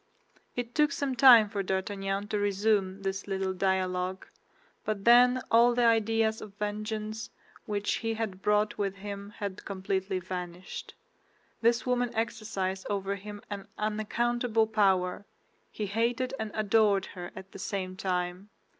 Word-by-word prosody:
It 245 Hz, -1 st, -4 dB
took 300 Hz, -1 st, +3 dB
some 280 Hz, -2 st, -1 dB
time 235 Hz, -4 st, +8 dB
for 205 Hz, -1 st, -2 dB
D'Artagnan 195 Hz, +1 st, -2 dB
to 210 Hz, -, 0 dB
resume 200 Hz, -1 st, +1 dB
this 195 Hz, +1 st, -3 dB
little 190 Hz, -1 st, -1 dB
dialogue; 185 Hz, 0 st, -1 dB, 0.6 s
but 210 Hz, -2 st, -3 dB
then 245 Hz, +2 st, +7 dB
all 235 Hz, +1 st, +6 dB
the 240 Hz, -1 st, +3 dB
ideas 225 Hz, -1 st, +2 dB
of 200 Hz, -2 st, -10 dB
vengeance 215 Hz, +1 st, -4 dB, 0.4 s
which 205 Hz, -1 st, 0 dB
he 225 Hz, -1 st, -2 dB
had 205 Hz, -4 st, -4 dB
brought 210 Hz, +1 st, +1 dB
with 200 Hz, -1 st, -1 dB
him 200 Hz, 0 st, -7 dB
had 200 Hz, -1 st, -5 dB
completely 190 Hz, 0 st, -2 dB
vanished. 180 Hz, -1 st, -6 dB, 0.7 s
This 235 Hz, 0 st, +3 dB
woman 245 Hz, -1 st, +1 dB
exercised 215 Hz, -4 st, -2 dB
over 200 Hz, -1 st, -1 dB
him 205 Hz, +1 st, -8 dB
an 200 Hz, -1 st, -5 dB
unaccountable 225 Hz, +2 st, +1 dB
power; 195 Hz, -4 st, +2 dB, 0.5 s
he 215 Hz, -, -3 dB
hated 235 Hz, +5 st, 0 dB
and 220 Hz, -1 st, -2 dB
adored 210 Hz, -2 st, +3 dB
her 175 Hz, -2 st, -6 dB
at 190 Hz, 0 st, -10 dB
the -, -, -10 dB
same 185 Hz, -1 st, -3 dB
time. 180 Hz, +1 st, -2 dB
205 Hz, 140 wpm, -29 LUFS, 190-225 Hz, 0.7 s, time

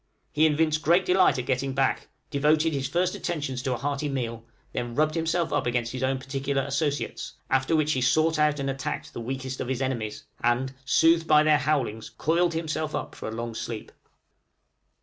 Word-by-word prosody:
He 155 Hz, +1 st, +4 dB
evinced 155 Hz, 0 st, +1 dB
great 175 Hz, +4 st, +3 dB
delight 185 Hz, -3 st, +4 dB
in 125 Hz, -, -3 dB
getting 135 Hz, 0 st, -1 dB
back, 135 Hz, -1 st, +1 dB, 0.2 s
devoted 155 Hz, +2 st, +2 dB
his 135 Hz, -2 st, -1 dB
first 175 Hz, +4 st, +1 dB
attentions 145 Hz, -7 st, -3 dB
to 130 Hz, 0 st, -1 dB
a -, -, -2 dB
hearty 145 Hz, +2 st, -2 dB
meal, 115 Hz, -4 st, -3 dB, 0.3 s
then 120 Hz, -1 st, -3 dB
rubbed 155 Hz, +1 st, +2 dB
himself 165 Hz, 0 st, 0 dB
up -, -, +1 dB
against 120 Hz, -1 st, 0 dB
his 130 Hz, -, -5 dB
own 130 Hz, 0 st, +1 dB
particular 135 Hz, +1 st, -2 dB
associates, 140 Hz, +1 st, -2 dB, 0.2 s
after 135 Hz, +4 st, +2 dB
which 155 Hz, -1 st, +2 dB
he 130 Hz, -, -1 dB
sought 155 Hz, +6 st, +3 dB
out 150 Hz, -1 st, +3 dB
and 135 Hz, -, -2 dB
attacked 135 Hz, +2 st, -4 dB
the -, -, -5 dB
weakest 130 Hz, +2 st, -4 dB
of -, -, -3 dB
his 130 Hz, -1 st, -1 dB
enemies, 120 Hz, -6 st, -3 dB, 0.2 s
and, 120 Hz, +3 st, +1 dB
soothed 165 Hz, +4 st, +4 dB
by 150 Hz, 0 st, +6 dB
their 155 Hz, -1 st, +4 dB
howlings, 135 Hz, -7 st, -1 dB
coiled 170 Hz, +1 st, +1 dB
himself 155 Hz, -1 st, -2 dB
up -, -, -4 dB
for -, -, -7 dB
a -, -, -6 dB
long 115 Hz, +1 st, -4 dB
sleep. 110 Hz, 0 st, -6 dB
140 Hz, 190 wpm, -26 LUFS, 130-155 Hz, 0.3 s, by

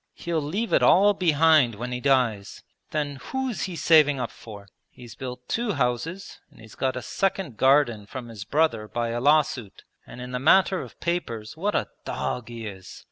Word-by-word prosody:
'He'll 170 Hz, -2 st, -2 dB
leave 195 Hz, +11 st, -3 dB
it -, -, +4 dB
all 205 Hz, +3 st, +5 dB
behind 155 Hz, -, +3 dB
when 125 Hz, +4 st, -5 dB
he 125 Hz, -, -3 dB
dies! 125 Hz, -7 st, 0 dB, 0.3 s
Then 145 Hz, -2 st, -3 dB
who's 265 Hz, -, -3 dB
he 185 Hz, -3 st, -6 dB
saving 150 Hz, -3 st, +4 dB
up 125 Hz, -, -3 dB
for? 100 Hz, -3 st, -12 dB, 0.2 s
He's 120 Hz, -2 st, -13 dB
built 125 Hz, -2 st, -8 dB
two 235 Hz, -2 st, -1 dB
houses, 140 Hz, +8 st, -3 dB
and -, -, -21 dB
he's 110 Hz, -1 st, -14 dB
got 130 Hz, -1 st, -1 dB
a 125 Hz, -, -5 dB
second 190 Hz, -, -2 dB
garden 125 Hz, -5 st, +3 dB
from 125 Hz, +1 st, -7 dB
his 110 Hz, -4 st, -8 dB
brother 130 Hz, -5 st, 0 dB
by 120 Hz, +1 st, -2 dB
a 120 Hz, +1 st, -3 dB
law 150 Hz, +3 st, +5 dB
suit. 120 Hz, -8 st, -9 dB, 0.2 s
And -, -, -11 dB
in 125 Hz, 0 st, -7 dB
the 125 Hz, -, -2 dB
matter 190 Hz, +6 st, +4 dB
of -, -, -12 dB
papers 120 Hz, -10 st, -3 dB
what 200 Hz, +6 st, -2 dB
a -, -, 0 dB, 0.2 s
dog 125 Hz, -2 st, -4 dB
he 115 Hz, -1 st, -7 dB
is! 95 Hz, -3 st, -9 dB
130 Hz, 190 wpm, -25 LUFS, 120-165 Hz, 0.3 s, all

